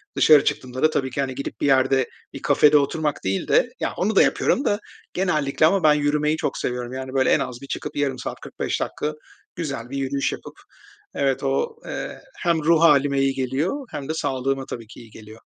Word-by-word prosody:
Dışarı 150 -2 +6
çıktığımda 130 0 -2
da 155 - +6
tabii 135 -4 -1
ki, 140 - -2
hani, 130 -1 -3
gidip 140 - -6
bir - - +1
yerde 135 -1 +3 0.3
bir - - -8
kafede 150 0 +5
oturmak 150 +1 -1
değil 95 +1 -1
de, - - +3
ya, - - -2
onu 210 +3 0
da - - +7
yapıyorum 275 - +2
da 205 - +1 0.3
genellikle 155 -6 +1
ama 185 +4 +3
ben 155 -1 +6
yürümeyi 150 +1 +1
çok - - -2
seviyorum. 125 0 -3
Yani, 130 0 -6
böyle, 135 -1 +2
en - - +3
az 125 0 -5
bir 140 - -9
çıkıp - - -5
0,5 140 -3 -1
saat - - -5
45 - - -3
dakika 150 +1 -3 0.4
güzel 140 -8 -4
bir 140 - -4
yürüyüş 135 0 -1
yapıp - - -8 0.6
Evet 135 -1 0
o, 140 - -1
eee, - - -6 0.2
hem 170 -3 0
ruh 165 +1 +4
hâlime 145 -4 +4
iyi 135 0 +2
geliyor 140 - -2
hem 140 0 -6
de - - 0
sağlığıma 135 -2 -1
tabii 115 -4 -7
ki 110 - -13
iyi 115 -3 -14
geliyor. 110 0 -13
140 Hz, 210 wpm, -23 LUFS, 130-155 Hz, 0.6 s, da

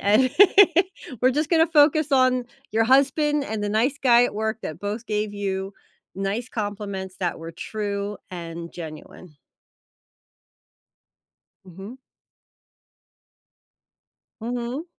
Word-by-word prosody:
And, 220 +6 +3 0.9
we're 255 +1 +4
just 300 +2 -1
gonna 325 -1 +4
focus 305 -1 +3
on 255 -1 +3 0.3
your 225 +1 +2
husband 285 +3 +3
and 220 -4 -4
the 205 - -1
nice 245 +7 0
guy 245 -1 +6
at - - -3
work 220 +1 -2
that 155 +1 -6
both 210 +3 -4
gave 210 -1 -2
you 195 -1 -3 0.4
nice 200 +6 -3
compliments 200 -3 -5
that 175 -3 -2
were 165 +1 -8
true 205 +1 -4
and 170 -1 -7
genuine. 160 0 -10 2.3
Mhm. 195 +7 -11 2.4
Mhm. 245 +5 -4
215 Hz, 110 wpm, -23 LUFS, 195-255 Hz, 2.4 s, guy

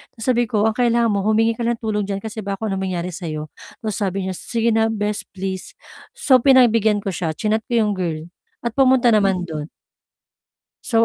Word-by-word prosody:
'Tas 225 - -7
sabi 240 -1 +2
ko, 215 0 +2
"Ang 220 - 0
kailangan 235 -1 +3
mo 200 -1 0
humingi 225 +1 +2
ka 240 - -3
ng 235 0 0
tulong 215 -2 -1
diyan 195 -1 -2
kasi 220 0 -5
baka 195 0 -4
kung - - -1
anong 190 0 -2
mangyari 175 -1 -3
sa'yo." 155 -3 -5 0.4
'Tas 215 -3 -2
sabi 195 -2 -1
niya, 190 - -2
"Sige 230 +4 -1
na, 225 0 +3
bes, 210 0 -2
please." 190 0 -4 0.4
So, 285 - +4
pinagbigyan 230 -6 +5
ko - - -6
siya, 165 -1 -2
chinat 220 +1 0
ko 240 -1 +1
'yong 210 -1 +1
girl 165 -3 -3 0.4
at 235 -1 -2
pumunta 260 -3 +5
naman 195 -3 +2
do'n. 155 -1 -5 1.1
So, 230 -1 +3
215 Hz, 200 wpm, -21 LUFS, 190-230 Hz, 1.1 s, pinagbigyan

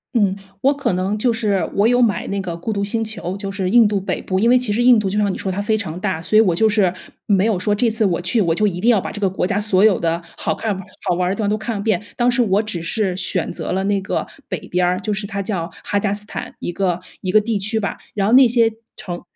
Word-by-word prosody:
嗯， 200 -4 +2 0.3
我 275 +2 +4
可 275 -9 -1
能 185 +3 -1
就 240 +2 +2
是 205 -6 0
我 205 +3 +4
有 245 +1 +3
买 225 -5 +1
那 200 0 -2
个 175 -3 -5
孤 215 +6 -3
独 200 - -1
星 225 +2 -1
球， 200 -3 -5
就 195 -1 -5
是 195 -2 -2
印 230 +1 +6
度 205 -2 -1
北 190 - -2
部。 185 0 -2
因 230 +4 +3
为 255 - +6
其 245 -5 0
实 235 - 0
印 245 -2 +6
度 205 - -2
就 200 +2 -1
像 205 -2 +1
你 - - -5
说 190 - -2
它 195 +2 -2
非 215 +1 +1
常 180 -5 -5
大。 190 -5 -2
所 180 +6 -2
以 - - +8
我 180 -6 +2
就 220 +4 +3
是 205 -4 +2 0.4
没 200 -2 +3
有 220 -5 +1
说 205 +3 +1
这 235 +3 +1
次 220 +1 -1
我 175 -3 +1
去， 180 +6 +1
我 165 -4 +1
就 215 - +1
一 180 -3 -1
定 235 - +3
要 220 -5 +5
把 - - -5
这 210 - -7
个 195 - +2
国 185 - -2
家 195 +2 0
所 205 -2 +2
有 215 -3 +4
的 165 0 0 0.2
好 160 - -2
看 215 -3 -2 0.3
好 - - +3
玩 180 0 0
儿 - - 0
的 - - -1
地 215 - -3
方 200 - +1
都 210 - +1
看 220 0 -4
个 200 - -4
遍。 210 -3 0
当 245 0 +3
时 245 +1 +2
我 205 -2 +2
只 180 -6 -4
是 185 +2 -1
选 180 -1 +1
择 - - -5
了 190 +1 0
那 200 0 0
个 190 - -2 0.2
北 185 - -3
边 180 +1 +1
儿， 180 +1 0
就 215 - -2
是 200 0 -3
它 200 -1 -4
叫 175 -5 -2
哈 205 - 0
加 200 -1 -1
斯 205 0 -3
坦 - - -7
一 - - -4
个 180 -1 -1 0.2
一 185 - -2
个 215 - +6
地 215 -1 -1
区 220 +3 +2
吧， 200 - -3 0.2
然 200 -1 +1
后 220 - +2
那 260 0 +8
些 230 -1 +3 0.3
城 175 -2 -6
200 Hz, 325 characters per minute, -19 LUFS, 185-220 Hz, 0.4 s, 以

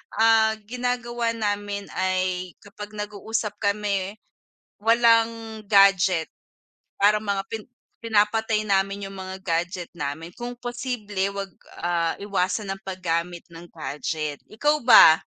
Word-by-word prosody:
ah, 220 -1 +4
ginagawa 240 -1 -2
namin 205 -2 -2
ay 185 -1 -1
kapag 205 +1 -10
nag-uusap 210 +1 -3
kami, 200 -1 -1 0.7
walang 230 -1 +3
gadget. 195 -4 +5 0.7
Parang 210 +1 +4
mga 200 -1 -1
pin 220 -1 -4 0.4
pinapatay 220 0 +1
namin 195 0 0
yung - - -11
mga 190 0 -6
gadget 175 +1 -2
namin 160 +3 -5
kung 245 0 -6
possible 240 -6 -3
wag, 190 - -22 0.3
ah, 170 -1 0
iwasan 195 0 -1
ang 195 - -12
paggamit 175 -2 -2
ng 170 +1 -11
gadget. 155 -1 -4
Ikaw 295 +7 +1
ba? 190 -9 +9
200 Hz, 115 wpm, -24 LUFS, 185-225 Hz, 0.7 s, ba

